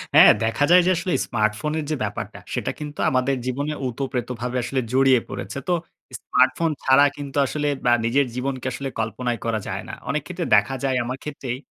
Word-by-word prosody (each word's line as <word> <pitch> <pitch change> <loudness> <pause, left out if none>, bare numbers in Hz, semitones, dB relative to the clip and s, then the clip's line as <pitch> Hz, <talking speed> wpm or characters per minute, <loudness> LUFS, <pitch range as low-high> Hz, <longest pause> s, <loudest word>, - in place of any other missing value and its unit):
হ্যাঁ, - - +10
দেখা 115 +6 +1
যায় 180 - +8
যে - - +5
আসলে 175 +1 -1
স্মার্টফোনের 115 +8 -1
যে 155 - 0
ব্যাপারটা 105 -1 -5
সেটা - - -1
কিন্তু 150 -1 -7
আমাদের 130 +1 +1
জীবনে 140 +4 -2
উতপ্রতভাবে 125 -1 -3
আসলে 130 +2 -1
জড়িয়ে 130 -2 +5
পড়েছে। - - -6
তো 180 - +2 0.5
স্মার্টফোন 165 -1 +2
ছাড়া 130 +2 +6
কিন্তু 140 -1 -6
আসলে 150 +1 -2 0.2
বা 120 - +5
নিজের 135 +5 +3
জীবনকে 130 0 -3
আসলে 135 -1 -4
কল্পনায় 115 +2 -2
করা 115 -1 0
যায় - - -4
না। - - -6 0.2
অনেক 150 +1 0
ক্ষেত্রে 180 -1 -4
দেখা 135 - +2
যায় 135 -2 +1
আমার 125 +2 -4
ক্ষেত্রেই 135 -4 -5
130 Hz, 180 wpm, -23 LUFS, 120-145 Hz, 0.5 s, হ্যাঁ